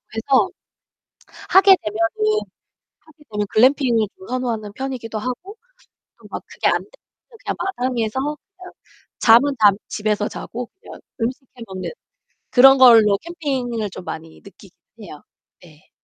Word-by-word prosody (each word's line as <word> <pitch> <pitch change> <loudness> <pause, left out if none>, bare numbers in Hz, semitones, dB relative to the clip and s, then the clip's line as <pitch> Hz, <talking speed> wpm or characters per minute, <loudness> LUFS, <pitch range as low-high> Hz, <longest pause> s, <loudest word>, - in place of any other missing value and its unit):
해서 265 +9 +2 1.0
하게 385 0 +7
되면은 325 - 0 0.6
하게 305 -1 -22
되면 210 -1 -2
글램핑을 240 -2 +3
좀 190 - -14
선호하는 235 -5 -3
편이기도 245 -4 -5
하고 255 - -6 0.6
또 - - -19
막 - - -6
그게 - - -2
안되면 - - 0 0.5
그냥 - - -3
마당에서 255 - -2 0.4
그냥 365 0 -12 0.5
잠은 245 +5 +5
잠 205 -2 +6
집에서 210 0 -1
자고 245 +1 -7
그냥 - - -12 0.2
음식 250 +4 -2
해 235 - -8
먹는 190 -1 -6 0.6
그런 270 +2 +7
걸로 225 -6 +7
캠핑을 265 -10 -3
좀 185 - -10
많이 160 0 -8
느끼긴 195 -1 -17 0.3
해요. 155 -7 -11 0.4
네. 155 -3 -20
240 Hz, 270 characters per minute, -20 LUFS, 210-270 Hz, 1.0 s, 하게